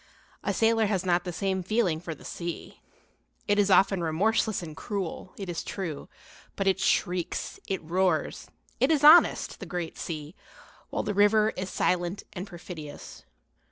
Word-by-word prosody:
A -, -, 0 dB
sailor 225 Hz, -1 st, +3 dB
has 190 Hz, -3 st, -1 dB
not 180 Hz, +1 st, +2 dB
the 180 Hz, -, -3 dB
same 190 Hz, +2 st, -1 dB
feeling 190 Hz, -4 st, +1 dB
for 165 Hz, -2 st, -5 dB
the -, -, -16 dB
sea. 170 Hz, -1 st, -6 dB, 0.7 s
It 205 Hz, 0 st, +3 dB
is 205 Hz, -1 st, +3 dB
often 195 Hz, -1 st, +4 dB
remorseless 190 Hz, +5 st, +1 dB
and 155 Hz, -2 st, -8 dB
cruel, 190 Hz, -1 st, -4 dB
it 195 Hz, -, -6 dB
is 175 Hz, -2 st, -3 dB
true; 170 Hz, -7 st, -5 dB, 0.5 s
but 195 Hz, -, -2 dB
it 195 Hz, 0 st, +2 dB
shrieks, 180 Hz, -2 st, 0 dB
it 190 Hz, -3 st, -2 dB
roars, 175 Hz, 0 st, 0 dB, 0.3 s
it 265 Hz, -, +3 dB
is 305 Hz, -3 st, +2 dB
honest, 315 Hz, +4 st, +6 dB
the -, -, -7 dB
great 175 Hz, -3 st, -5 dB
sea; 155 Hz, -1 st, -5 dB, 0.6 s
while -, -, -2 dB
the 205 Hz, -, -2 dB
river 210 Hz, +2 st, +4 dB
is 185 Hz, +1 st, -4 dB
silent 180 Hz, +2 st, 0 dB
and 185 Hz, +1 st, -6 dB
perfidious. 170 Hz, -, -9 dB
185 Hz, 160 wpm, -27 LUFS, 170-205 Hz, 0.7 s, honest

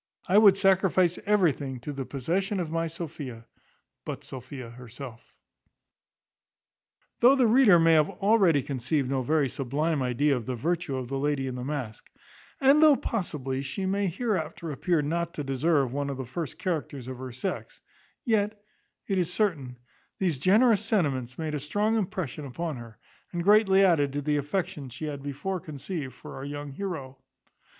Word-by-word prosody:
I 195 Hz, +3 st, +6 dB
would 200 Hz, -3 st, +7 dB
sacrifice 190 Hz, -2 st, +3 dB
everything 150 Hz, -10 st, +1 dB
to 145 Hz, +4 st, -5 dB
the 135 Hz, -2 st, -5 dB
possession 185 Hz, -, -1 dB
of 165 Hz, -3 st, -3 dB
my 165 Hz, 0 st, 0 dB
Sophia, 145 Hz, -8 st, -7 dB, 0.6 s
but -, -, -6 dB
Sophia 130 Hz, -1 st, -8 dB
herself." 125 Hz, 0 st, -10 dB, 1.9 s
Though 250 Hz, +3 st, +7 dB
the 260 Hz, -3 st, +4 dB
reader 225 Hz, -5 st, +6 dB
may 165 Hz, 0 st, +5 dB
have 155 Hz, -1 st, +4 dB
already 195 Hz, -, +3 dB
conceived 135 Hz, +1 st, -1 dB
no 135 Hz, -1 st, +1 dB
very 150 Hz, +2 st, +2 dB
sublime 145 Hz, +4 st, -1 dB
idea 130 Hz, +3 st, +2 dB
of 120 Hz, -3 st, -5 dB
the 130 Hz, -, -2 dB
virtue 165 Hz, +3 st, -1 dB
of 130 Hz, -1 st, -4 dB
the 135 Hz, +2 st, -3 dB
lady 145 Hz, -1 st, 0 dB
in 130 Hz, -, -3 dB
the 125 Hz, 0 st, -5 dB
mask; 130 Hz, -5 st, -5 dB, 0.5 s
and 275 Hz, +2 st, +5 dB
though 305 Hz, -2 st, +8 dB
possibly 145 Hz, -, -3 dB
she 140 Hz, +8 st, -4 dB
may 200 Hz, +1 st, 0 dB
hereafter 170 Hz, -5 st, -2 dB
appear 160 Hz, +2 st, 0 dB
not 170 Hz, +3 st, -2 dB
to 150 Hz, -, -3 dB
deserve 135 Hz, 0 st, +1 dB
one 140 Hz, 0 st, -2 dB
of 135 Hz, -, -4 dB
the 130 Hz, -, -4 dB
first 155 Hz, +5 st, -5 dB
characters 145 Hz, -8 st, -3 dB
of 130 Hz, -1 st, -6 dB
her 130 Hz, -1 st, -6 dB
sex; 180 Hz, +10 st, -5 dB, 0.4 s
yet, 215 Hz, -4 st, +1 dB, 0.5 s
it 195 Hz, -2 st, 0 dB
is 180 Hz, -1 st, 0 dB
certain, 150 Hz, -, -1 dB, 0.4 s
these 175 Hz, -8 st, 0 dB
generous 210 Hz, -, +4 dB
sentiments 135 Hz, -, 0 dB
made 155 Hz, -2 st, -3 dB
a 150 Hz, -, -1 dB
strong 205 Hz, +10 st, 0 dB
impression 175 Hz, -, -3 dB
upon 160 Hz, +4 st, -4 dB
her, 115 Hz, -2 st, -11 dB, 0.3 s
and 175 Hz, -1 st, -2 dB
greatly 200 Hz, -1 st, +5 dB
added 145 Hz, -6 st, +3 dB
to 145 Hz, -, -2 dB
the 150 Hz, 0 st, +1 dB
affection 145 Hz, -2 st, -3 dB
she 130 Hz, +6 st, -6 dB
had 145 Hz, -2 st, -5 dB
before 145 Hz, +7 st, -3 dB
conceived 150 Hz, -2 st, -6 dB
for -, -, -10 dB
our 135 Hz, -, -6 dB
young 145 Hz, 0 st, -6 dB
heroe. 135 Hz, -6 st, -6 dB
150 Hz, 170 wpm, -27 LUFS, 135-190 Hz, 1.9 s, though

